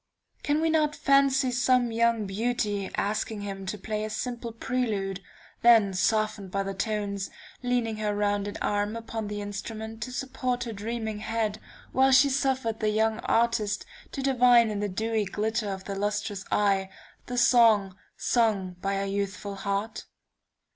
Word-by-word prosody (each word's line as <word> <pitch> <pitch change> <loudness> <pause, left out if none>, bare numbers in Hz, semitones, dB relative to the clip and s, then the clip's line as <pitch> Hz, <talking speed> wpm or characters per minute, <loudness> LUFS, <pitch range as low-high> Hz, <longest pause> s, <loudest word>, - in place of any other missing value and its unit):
Can 295 +1 +1
we 325 0 +2
not 305 -2 +2
fancy 275 -1 +3
some 250 -1 +2
young 230 -1 +2
beauty 205 -1 -1
asking 210 +1 -2
him 195 -1 -6
to 210 - -3
play 215 +2 -3
a 215 - -3
simple 240 +1 -4
prelude, 215 -5 -2 0.4
then 225 -5 +6
softened 215 +1 0
by 195 +2 -1
the 195 0 -4
tones, 200 -1 -2 0.3
leaning 245 -3 0
her 210 -1 -1
rounded 205 0 -1
arm 205 +1 0
upon 225 -1 -5
the 205 0 -4
instrument 220 +2 -6
to 255 - -4
support 255 -2 -2
her 235 -2 -5
dreaming 220 0 -4
head, 220 -1 -2 0.3
while 265 +1 +4
she 270 +1 +6
suffered 260 -4 0
the 215 - +1
young 220 +1 +1
artist 225 -3 +1 0.3
to 275 - -3
divine 245 -4 +5
in 205 - -3
the 205 0 -1
dewy 220 +3 -1
glitter 215 +2 -1
of 190 -1 -5
the 200 - -5
lustrous 205 -1 -2
eyes, 195 -2 +2 0.4
the 245 - -4
song 225 -6 +5 0.2
sung 200 -7 +1
by 195 +1 -1
her 195 0 -1
youthful 200 0 -3
heart? 200 +2 -3
220 Hz, 155 wpm, -27 LUFS, 205-240 Hz, 0.4 s, then